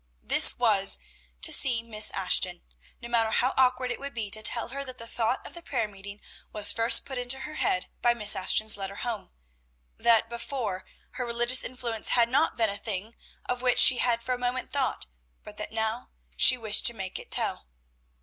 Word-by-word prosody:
This - - +6
was, 65 - +2 0.5
to - - +3
see 240 -4 +4
Miss 215 -2 +1
Ashton, 180 -1 0 0.4
no - - -7
matter 230 -2 0
how 250 +4 -1
awkward 255 -1 0
it - - -6
would 280 -1 -9
be 215 -4 -6
to 215 - -4
tell 230 +2 0
her 275 +3 -6
that 255 -2 -11
the 230 - -9
thought 230 +1 -3
of - - -10
the 345 - -11
prayer 240 -9 -3
meeting 200 0 -12 0.3
was 205 -1 +3
first 230 0 +4
put 265 -2 -7
into 245 +2 +1
her 300 +3 -8
head 185 -11 -2 0.2
by 240 0 +2
Miss 210 -3 +5
Ashton's 215 +3 +2
letter 195 0 -7
home; 230 -2 -6 0.7
that 230 -1 +3
before, 235 -5 -6 0.3
her 255 - -6
religious 240 +2 +2
influence 235 -3 -6
had 235 -1 +2
not 275 +4 0
been 225 -3 +1
a 200 - -7
thing 210 +1 -6 0.3
of 250 0 -4
which 250 -1 +1
she 255 -2 +8
had 235 -1 -1
for 255 - -3
a 250 - -5
moment 250 +1 -4
thought, 275 -2 -2 0.4
but 210 0 -14
that 210 - -7
now 220 +2 -4 0.3
she 255 - +6
wished 220 -3 +2
to 235 - -3
make 190 -3 -7
it - - -13
tell. - - -3
235 Hz, 200 wpm, -26 LUFS, 215-250 Hz, 0.7 s, she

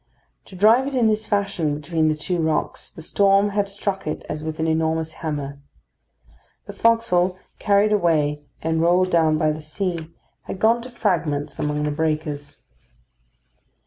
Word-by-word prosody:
To 190 - -13
drive 225 +8 +5
it 280 - -4
in 245 -3 +3
this 215 0 +1
fashion 195 -7 0
between 155 +2 0
the 155 - +2
two 175 +3 -3
rocks, 160 -1 -1
the 160 - -11
storm 200 +3 +3
had 200 0 -1
struck 195 -2 -3
it 155 - -4
as 150 - -5
with 160 0 -5
an 160 - 0
enormous 160 0 0
hammer. 145 -3 -4 1.1
The - - -8
forecastle 185 -6 +2 0.2
carried 205 +1 +3
away 155 -6 +1 0.2
and 160 0 0
rolled 180 +2 +3
down 160 -2 +3
by 155 -1 +2
the 155 +1 -5
sea, 165 +1 -3 0.4
had - - -5
gone 230 +4 +3
to 250 - -9
fragments 150 - -1
among 150 0 -1
the 150 - 0
breakers. 150 -1 -2
165 Hz, 160 wpm, -22 LUFS, 155-200 Hz, 1.1 s, drive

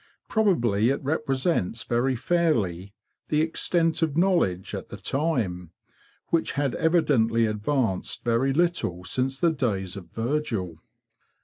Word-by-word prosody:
Probably 120 - +2
it 135 - 0
represents 135 - 0
very 125 +2 0
fairly 110 - 0 0.3
the 150 0 +2
extent 165 +1 +1
of 160 -2 0
knowledge 170 - +1
at - - -6
the - - -7
time, 110 - -2 0.6
which 165 -1 +1
had 140 -3 0
evidently 145 -9 +2
advanced 105 -1 -1
very 120 +3 +2
little 145 - 0
since 130 +6 -1
the 170 - +3
days 100 - -2
of 100 -3 -9
Virgil. 115 - -2
130 Hz, 120 wpm, -26 LUFS, 105-160 Hz, 0.6 s, the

